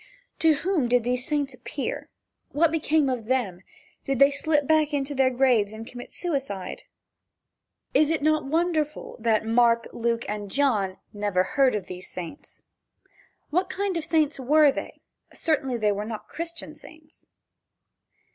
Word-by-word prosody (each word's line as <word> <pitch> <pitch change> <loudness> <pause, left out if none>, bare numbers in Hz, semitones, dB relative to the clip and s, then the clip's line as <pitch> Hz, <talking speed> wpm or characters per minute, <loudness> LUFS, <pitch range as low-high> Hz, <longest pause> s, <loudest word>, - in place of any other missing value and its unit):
To 320 -2 +5
whom 330 -3 0
did 245 0 +3
these 250 +1 -1
saints 290 -3 -1
appear? 255 +3 -5 0.4
What 320 +2 +3
became 315 -2 +2
of 250 -4 -2
them? 220 -8 -1 0.4
Did 275 -1 -1
they 275 +2 +6
slip 295 0 +1
back 310 0 +3
into 280 0 -1
their 265 -1 +3
graves 245 -5 +2
and 220 +1 -8
commit 245 +1 -10
suicide? 270 - -3 1.1
Is 305 - +4
it 320 -3 0
not 310 0 +3
wonderful 310 0 -1
that 220 -1 +1
Mark, 230 0 +3
Luke 235 0 -1
and 205 -1 -4
John 210 -8 +1 0.2
never 205 -3 +1
heard 270 0 +2
of 200 -3 -3
these 180 0 -9
saints? 180 - -9 0.9
What 365 +4 +1
kind 390 0 -2
of 330 - -1
saints 310 -2 +1
were 295 +3 +5
they? - - -7 0.3
Certainly 280 -6 0
they 210 -2 +2
were 205 +1 -2
not 215 0 -6
Christian 335 -2 -6
saints. 310 +1 -17
270 Hz, 150 wpm, -25 LUFS, 230-310 Hz, 1.1 s, they